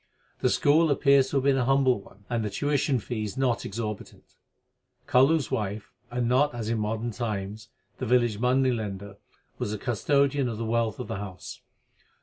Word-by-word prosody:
The - - +2
school 155 +3 +3
appears 140 -1 +4
to 140 - 0
have 135 - +1
been 135 -1 +3
a 125 - +1
humble 130 -4 +3
one, 100 +1 -19
and 120 -2 -1
the 105 - -2
tuition 145 +4 0
fees 110 -1 -4
not 130 -3 0
exorbitant. 105 0 -6 0.7
Kalu 135 +6 +5
s 140 -8 -5
wife 105 0 -3 0.2
and 120 0 -1
not, 130 +2 +2
as 115 -2 -4
in 115 - 0
modern 110 +2 -2
times, 110 -1 -4 0.3
the 130 - -3
village 120 -3 +2
money 130 +2 +3
lender 100 -3 -5 0.4
was - - -2
the - - -3
custodian 140 +4 +1
of 115 - -5
the 115 - -3
wealth 115 -1 0
of 125 - -5
the - - -4
house. 95 -2 -8
120 Hz, 180 wpm, -27 LUFS, 105-135 Hz, 0.7 s, Kalu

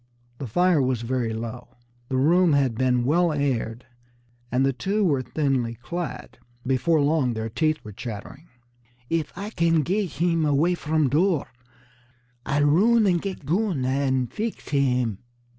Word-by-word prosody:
The 135 - -5
fire 175 - +3
was 130 -3 0
very 120 -1 -1
low, 120 +2 -7 0.3
the 130 - 0
room 165 +5 +4
had 135 -4 +2
been 125 0 +1
well 170 +5 +3
aired, 125 -5 -2 0.7
and 130 +2 +2
the 135 - +1
two 200 - 0
were 140 -7 +2
thinly 130 -4 -1
clad. 170 +4 -6 0.3
Before 135 +5 +2
long 140 -4 +1
their 110 0 -3
teeth 155 +6 0
were 105 - -9
chattering. 115 - -8 0.6
"Eef 165 -3 0
Ah 200 +4 -6
can 165 -2 +2
get 190 +1 -1
heem 165 +1 +1
away 150 +4 +2
from 155 -2 0
door, 160 +3 +1 1.0
Ah'll 145 +1 +1
roon 215 +10 +4
an' 180 -3 +3
get 185 -4 -5
goon 175 -4 0
an' 130 -1 +1
feex 220 - -5
heem!" 125 -7 +1
145 Hz, 150 wpm, -24 LUFS, 125-170 Hz, 1.0 s, room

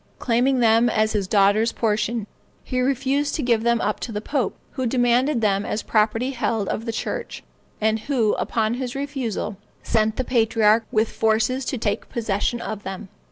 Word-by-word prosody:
Claiming 250 +2 +1
them 230 +1 +4
as 215 -1 +1
his 205 -3 -1
daughter's 205 +3 +3
portion, 220 0 -1 0.4
he 255 -1 -2
refused 275 +2 0
to 305 - -2
give 235 -3 +2
them 235 0 +2
up 210 - -1
to 235 - -5
the 210 - -3
pope, 265 +3 -2 0.2
who 260 -2 -2
demanded 245 +2 +2
them 200 -2 +2
as 210 - -3
property 225 +4 +1
held 230 -5 -1
of 225 - -3
the 230 - -2
church, 475 - -4 0.4
and 220 +1 +1
who, 230 -3 +1
upon 220 -1 0
his 250 0 -4
refusal, 270 -8 -3 0.3
sent 220 -1 +1
the 260 - -1
patriarch 225 -2 +3
with 215 +1 +1
forces 225 +4 +1
to 260 - -2
take 210 -3 -2
possession 225 +1 -1
of 215 -3 -5
them. 190 0 -7
230 Hz, 175 wpm, -23 LUFS, 215-255 Hz, 0.4 s, them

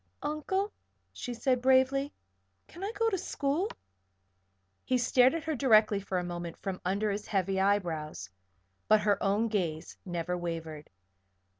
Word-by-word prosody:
"Uncle," 380 +7 -1 0.4
she 245 - -5
said, 245 +1 0
bravely, 265 +2 +3 0.6
"can 350 - -10
I 405 - -2
go 455 - +2
to 385 - 0
school?" 320 +3 -1 1.1
He 255 - +1
stared 250 +3 +4
at 330 - -3
her 315 - -1
directly 220 -6 +4
for 195 -1 -3
a 180 - 0
moment, 175 -1 -5
from 190 -2 -5
under 200 +3 0
his 205 +1 -4
heavy 195 -1 0 0.2
brows; 155 - -5 0.6
but 215 0 +5
her 210 -1 +2
own 205 +3 +2
gaze 175 -8 -2
never 175 -1 -3
wavered. 165 -3 -5
215 Hz, 145 wpm, -30 LUFS, 180-270 Hz, 1.1 s, but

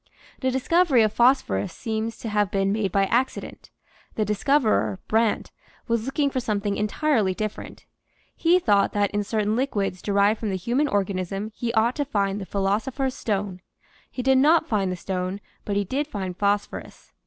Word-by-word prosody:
The 260 - 0
discovery 265 0 +3
of 215 -1 +1
phosphorus 235 - +2
seems 225 -1 -3
to 225 - -5
have 210 -2 +1
been 195 0 +1
made 205 -3 0
by 195 +1 +3
accident; 245 +6 -2 0.5
the 215 - 0
discoverer, 210 - +1
Brandt, 225 0 +1 0.4
was 230 0 0
looking 280 +1 0
for 260 - -1
something 205 -3 -1
entirely 210 -2 +1
different. 215 +1 -6 0.5
He 345 +2 +4
thought 205 - +2
that 205 -1 +1
in 205 0 -1
certain 215 0 0
liquids 205 -8 -1
derived 200 +1 +2
from 220 - -2
the 190 - -1
human 240 - 0
organism 195 -1 -2
he 235 +1 -3
ought 230 +3 +3
to 290 - 0
find 200 -5 -1
the 190 - -7
philosopher's 225 - -1
stone; 195 -5 -3 0.5
he 250 - -5
did 265 0 +4
not 315 +3 +4
find 200 - 0
the - - -2
stone, 185 +1 -3 0.3
but 200 - -2
he 205 - +2
did 275 +9 -2
find 190 -8 -4
phosphorus. 205 +1 -2
210 Hz, 170 wpm, -24 LUFS, 200-255 Hz, 0.5 s, He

